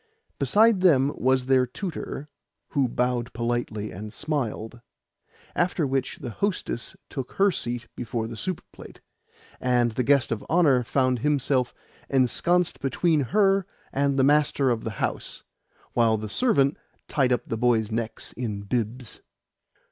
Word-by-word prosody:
Beside 220 Hz, -2 st, +4 dB
them 145 Hz, -6 st, +4 dB
was 130 Hz, 0 st, +2 dB
their 130 Hz, -1 st, +3 dB
tutor, 150 Hz, -1 st, -5 dB, 0.4 s
who 140 Hz, -2 st, +1 dB
bowed 125 Hz, 0 st, -1 dB
politely 115 Hz, -2 st, -2 dB
and 105 Hz, +3 st, -7 dB
smiled; 120 Hz, -6 st, -3 dB, 0.7 s
after 175 Hz, -2 st, +1 dB
which 135 Hz, -1 st, -1 dB
the 125 Hz, -, -6 dB
hostess 185 Hz, -, -3 dB
took 135 Hz, -3 st, -6 dB
her 200 Hz, 0 st, +4 dB
seat 120 Hz, -6 st, -3 dB
before 115 Hz, -1 st, -3 dB
her 115 Hz, -, -7 dB
soup 185 Hz, +8 st, -4 dB
plate, -, -, -13 dB, 0.6 s
and 125 Hz, -2 st, +2 dB
the 120 Hz, -, -1 dB
guest 135 Hz, -2 st, +3 dB
of 115 Hz, -, -2 dB
honour 155 Hz, -7 st, +4 dB
found 130 Hz, 0 st, +1 dB
himself 135 Hz, -2 st, +1 dB, 0.4 s
esconsed 165 Hz, +7 st, +2 dB
between 155 Hz, +4 st, +1 dB
her 195 Hz, -, +2 dB, 0.3 s
and 140 Hz, 0 st, +1 dB
the 135 Hz, -, +4 dB
master 145 Hz, -2 st, +3 dB
of 115 Hz, -2 st, -1 dB
the -, -, -2 dB
house, -, -, -3 dB, 0.5 s
while 115 Hz, -2 st, +3 dB
the 110 Hz, 0 st, -5 dB
servant 140 Hz, -, +2 dB, 0.3 s
tied 135 Hz, -3 st, +1 dB
up 120 Hz, -1 st, +1 dB
the -, -, -2 dB
boys' 115 Hz, -2 st, +2 dB
necks 115 Hz, 0 st, -4 dB
in 110 Hz, -5 st, -4 dB
bibs. 115 Hz, +3 st, -3 dB
130 Hz, 140 wpm, -25 LUFS, 120-145 Hz, 0.7 s, Beside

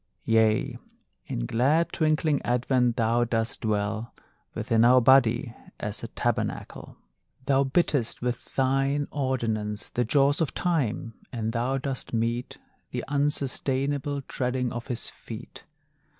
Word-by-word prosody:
Yea, 110 Hz, -1 st, +2 dB, 0.5 s
in -, -, -3 dB
glad 145 Hz, -, +2 dB
twinkling 155 Hz, -2 st, +2 dB
advent, 125 Hz, 0 st, +1 dB
thou 115 Hz, +1 st, +2 dB
dost 115 Hz, 0 st, -1 dB
dwell 110 Hz, +1 st, -1 dB, 0.4 s
Within 115 Hz, 0 st, +2 dB
our 125 Hz, +2 st, +7 dB
body 120 Hz, -2 st, +4 dB, 0.2 s
as -, -, -3 dB
a -, -, -5 dB
tabernacle! -, -, -3 dB, 0.5 s
Thou 135 Hz, 0 st, +3 dB
bittest 135 Hz, -4 st, +1 dB
with 120 Hz, -1 st, -2 dB
thine 135 Hz, +2 st, +1 dB
ordinance 110 Hz, -6 st, -2 dB
The 120 Hz, -, 0 dB
jaws 140 Hz, +5 st, +3 dB
of 160 Hz, -, -1 dB
Time, 140 Hz, -8 st, -1 dB, 0.2 s
and 110 Hz, -2 st, -2 dB
thou 125 Hz, +3 st, 0 dB
dost 135 Hz, -2 st, -4 dB
mete 115 Hz, +2 st, -1 dB, 0.3 s
The -, -, -4 dB
unsustainable 140 Hz, 0 st, 0 dB
treading 125 Hz, -1 st, -2 dB
of 120 Hz, 0 st, -6 dB
his 125 Hz, -3 st, -2 dB
feet. 115 Hz, +1 st, -10 dB
125 Hz, 120 wpm, -27 LUFS, 115-140 Hz, 0.5 s, our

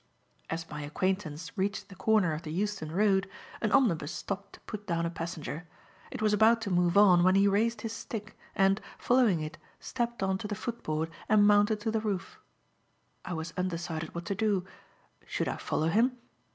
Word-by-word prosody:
As 165 Hz, 0 st, -3 dB
my 150 Hz, -1 st, -6 dB
acquaintance 165 Hz, 0 st, -2 dB
reached 200 Hz, 0 st, -2 dB
the 195 Hz, -, -11 dB
corner 205 Hz, -4 st, +3 dB
of 155 Hz, -, -4 dB
the 155 Hz, -, -7 dB
Euston 195 Hz, -2 st, -2 dB
Road, 195 Hz, +1 st, +2 dB, 0.3 s
an 215 Hz, -, 0 dB
omnibus 175 Hz, -, +3 dB
stopped 200 Hz, 0 st, -5 dB
to -, -, -13 dB
put 210 Hz, -2 st, -8 dB
down 170 Hz, -2 st, 0 dB
a 170 Hz, -, -2 dB
passenger. 165 Hz, -1 st, -5 dB, 0.4 s
It -, -, -5 dB
was 215 Hz, -1 st, +3 dB
about 220 Hz, +3 st, +5 dB
to 205 Hz, -3 st, -3 dB
move 175 Hz, +1 st, +3 dB
on 185 Hz, -4 st, +7 dB
when 185 Hz, +1 st, +5 dB
he 200 Hz, +1 st, +5 dB
raised 215 Hz, +3 st, +1 dB
his 225 Hz, 0 st, -4 dB
stick, 215 Hz, -1 st, -6 dB, 0.2 s
and, 195 Hz, +1 st, +3 dB, 0.2 s
following 240 Hz, -9 st, +3 dB
it, 155 Hz, +1 st, -6 dB, 0.2 s
stepped 240 Hz, -4 st, -3 dB
on 190 Hz, 0 st, +1 dB
the 210 Hz, +1 st, -4 dB
footboard 165 Hz, -8 st, -3 dB, 0.2 s
and 210 Hz, -1 st, +6 dB
mounted 210 Hz, +1 st, +4 dB
to 225 Hz, -, -1 dB
the 220 Hz, 0 st, 0 dB
roof. 210 Hz, -, -3 dB, 0.8 s
I 180 Hz, -, -5 dB
was 165 Hz, 0 st, -4 dB
undecided 170 Hz, -3 st, -3 dB
what 170 Hz, 0 st, -5 dB
to 200 Hz, -, -1 dB
do. 200 Hz, -2 st, +1 dB, 0.6 s
Should -, -, -1 dB
I -, -, -2 dB
follow 160 Hz, +1 st, 0 dB
him? 245 Hz, +7 st, +2 dB
195 Hz, 185 wpm, -30 LUFS, 170-215 Hz, 0.8 s, on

